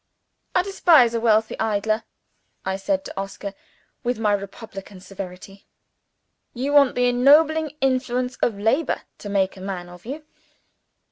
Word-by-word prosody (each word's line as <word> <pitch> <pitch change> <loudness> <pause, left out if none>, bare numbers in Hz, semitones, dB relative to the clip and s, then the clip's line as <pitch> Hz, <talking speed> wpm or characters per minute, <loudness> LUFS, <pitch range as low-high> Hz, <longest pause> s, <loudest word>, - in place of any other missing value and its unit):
"I 360 - +4
despise 335 -11 +5
a 230 - 0
wealthy 220 -1 +2
idler," 215 +1 0 0.6
I 190 - -1
said 285 +9 -1
to - - -7
Oscar, 195 0 -5 0.5
with 245 0 -1
my 215 -2 +2
republican 200 -1 -6
severity. 190 +1 -10 0.9
"You 270 +4 -2
want 280 -3 +5
the 245 - +2
ennobling 300 +5 +4
influence 255 -1 0
of 220 -4 0
labor 245 +9 0 0.2
to 205 - -7
make 195 -1 +1
a - - -10
man 185 -2 -5
of 180 +4 -14
you. 300 +4 -6
225 Hz, 140 wpm, -23 LUFS, 195-270 Hz, 0.9 s, despise